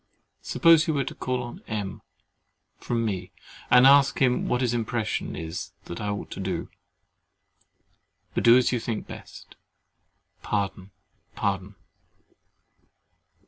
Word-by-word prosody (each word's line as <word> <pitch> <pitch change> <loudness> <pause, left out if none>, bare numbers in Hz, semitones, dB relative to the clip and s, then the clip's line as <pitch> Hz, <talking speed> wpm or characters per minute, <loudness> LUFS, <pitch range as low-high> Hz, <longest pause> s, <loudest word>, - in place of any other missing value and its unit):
Suppose 165 -2 +4
you 160 - +1
were 140 - +1
to - - -6
call 125 0 -2
on 120 - -9
M—— 105 -4 -4 0.8
from 115 -1 -1
me, 95 -4 -3 0.4
and 125 +1 +7
ask 140 0 +6
him 125 -2 +2
what 125 - 0
his 120 -2 +1
impression 115 -1 -2
is 80 +2 -6
that 85 - -7
I 105 - -2
ought 100 0 -4
to - - -7
do. 95 -3 -3 1.6
But - - -1
do 120 +1 +8
as 130 - +3
you 125 - 0
think 110 -1 -4
best. - - -12 0.8
Pardon, 100 -2 -2 0.5
pardon. 100 0 -2
115 Hz, 130 wpm, -26 LUFS, 100-125 Hz, 1.6 s, do